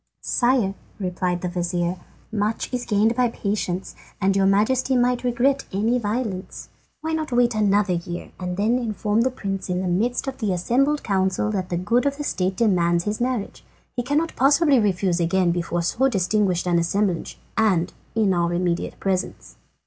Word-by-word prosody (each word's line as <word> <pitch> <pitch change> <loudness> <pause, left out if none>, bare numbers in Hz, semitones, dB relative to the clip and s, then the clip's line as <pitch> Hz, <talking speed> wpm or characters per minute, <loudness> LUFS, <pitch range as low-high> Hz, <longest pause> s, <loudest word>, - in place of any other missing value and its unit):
"Sire," 240 -5 +2 0.3
replied 180 -2 -2
the 180 - -2
vizir, 175 0 -1 0.3
"much 215 +3 -2
is 245 -1 -2
gained 215 +2 +2
by 250 0 +3
patience, 200 -4 -3 0.3
and 195 0 +2
your 195 -1 +3
Majesty 245 +7 +2
might 245 0 +1
regret 265 +3 +1
any 225 +6 +1
violence. 210 -3 -4 0.3
Why 320 +1 -2
not 315 -3 -2
wait 240 -1 +3
another 205 -2 +2
year 175 0 -5
and 180 -1 -4
then 225 +5 +2
inform 215 -2 0
the 255 - +2
Prince 195 -7 -4
in 180 0 0
the 185 - -2
midst 220 +8 0
of 270 0 -4
the 210 -5 0
assembled 270 +11 +1
council 190 +1 0
that 185 -3 -2
the 175 - -1
good 230 +9 +1
of 280 0 -1
the 295 - -4
state 185 -8 -1
demands 175 -6 +2
his 210 +3 -3
marriage? 245 -4 -2 0.3
He 245 - 0
cannot 295 +6 0
possibly 280 +1 +4
refuse 190 -4 +1
again 175 +1 +2
before 170 0 -1
so 250 +10 +2
distinguished 195 -4 +1
an 175 -1 +2
assemblage, 180 +1 -1 0.2
and 190 -6 +2 0.2
in 210 -4 +3
our 175 -1 +1
immediate 175 -1 -1
presence." 190 -1 -3
205 Hz, 170 wpm, -23 LUFS, 180-245 Hz, 0.3 s, possibly